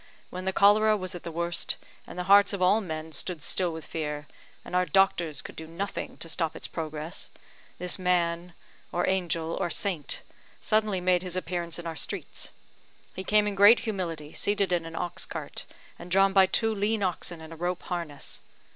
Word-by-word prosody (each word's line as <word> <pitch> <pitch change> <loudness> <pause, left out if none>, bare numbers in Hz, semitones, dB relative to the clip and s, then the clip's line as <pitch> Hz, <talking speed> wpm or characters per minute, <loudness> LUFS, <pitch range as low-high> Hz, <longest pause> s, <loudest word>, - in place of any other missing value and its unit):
When 185 +1 -5
the 190 - +1
cholera 210 +2 +5
was 185 -2 -4
at 175 - -6
the - - -6
worst, 170 +1 +1 0.3
and - - -9
the 180 - -1
hearts 200 +2 +6
of 200 - -3
all 205 +5 +5
men 160 -4 -5
stood 155 +1 -3
still 180 -2 +2
with 160 -1 -7
fear, 150 -2 -4 0.4
and - - -5
our 180 - +4
doctors 175 -5 +2
could - - -9
do 160 - -7
nothing 190 +5 -4
to - - -3
stop 165 -1 -1
its - - -6
progress, 155 +1 -5 0.5
this 180 +1 0
man, 175 -1 +1 0.4
or 175 - 0
angel, 170 -3 0
or 185 -3 0
saint, 175 -5 0 0.4
suddenly 215 -4 +1
made 180 -1 +3
his 180 -1 -3
appearance 175 -2 -2
in 175 - -8
our 165 -1 -4
streets. - - -4 0.6
He 185 - -4
came 210 +1 +4
in 205 - 0
great 205 +4 +7
humility, 170 -9 -4
seated 200 -2 +1
in 170 -2 0
an 165 - -8
ox 175 0 -2
cart, - - -6 0.3
and 175 - -9
drawn 195 +1 +4
by 190 -1 +7
two 225 +3 +1
lean 210 +1 0
oxen 175 -2 -2
and 160 0 -9
a - - -8
rope 175 +2 -2
harness. 170 -6 -4
180 Hz, 190 wpm, -28 LUFS, 165-195 Hz, 0.6 s, great